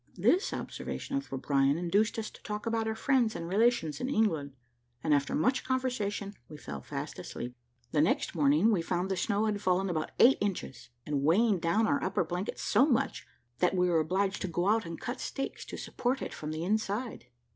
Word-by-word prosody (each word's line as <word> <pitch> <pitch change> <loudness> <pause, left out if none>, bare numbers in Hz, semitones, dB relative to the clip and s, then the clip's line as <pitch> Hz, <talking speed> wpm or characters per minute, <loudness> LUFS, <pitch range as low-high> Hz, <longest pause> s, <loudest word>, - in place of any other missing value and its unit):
This 375 +4 +3
observation 275 - -5
of 275 - -5
O'Brien 135 +1 +2
induced 200 +7 +1
us 220 -1 -3
to - - -16
talk 210 +1 -5
about 225 -1 0
our 220 - -1
friends 240 -1 +2
and 165 - -4
relations 210 -4 +2
in 255 - -1
England, 160 - +1 0.5
and 150 - +3
after 140 -1 +1
much 255 - +2
conversation 220 -6 -2 0.2
we 150 - -9
fell 70 - -7
fast - - -6
asleep. 125 +1 -6 0.4
The 150 - +3
next 160 - +1
morning 155 +7 +4
we 190 -6 +2
found 180 +3 -1
the - - +1
snow 205 +3 0
had 210 -2 -1
fallen 185 0 +1
about 155 -2 -2
eight 260 +3 +6
inches, 135 - -3 0.2
and 145 -2 -1
weighing 190 +7 +3
down 170 +7 +2
our 280 +4 +1
upper 185 -1 +1
blanket 175 +4 -4
so 245 +7 +3
much, 245 -6 0 0.3
that 180 +1 +2
we 180 0 +3
were 165 -2 +3
obliged 190 +5 0
to 190 - -1
go 175 +2 0
out 220 -4 +2
and 165 -1 -6
cut 245 - -4
stakes 270 - -4
to - - -7
support 255 +2 -2
it - - -3
up - - -9
from 150 - -6
the 155 +1 -3
inside. 215 - -2
195 Hz, 205 wpm, -30 LUFS, 160-225 Hz, 0.5 s, eight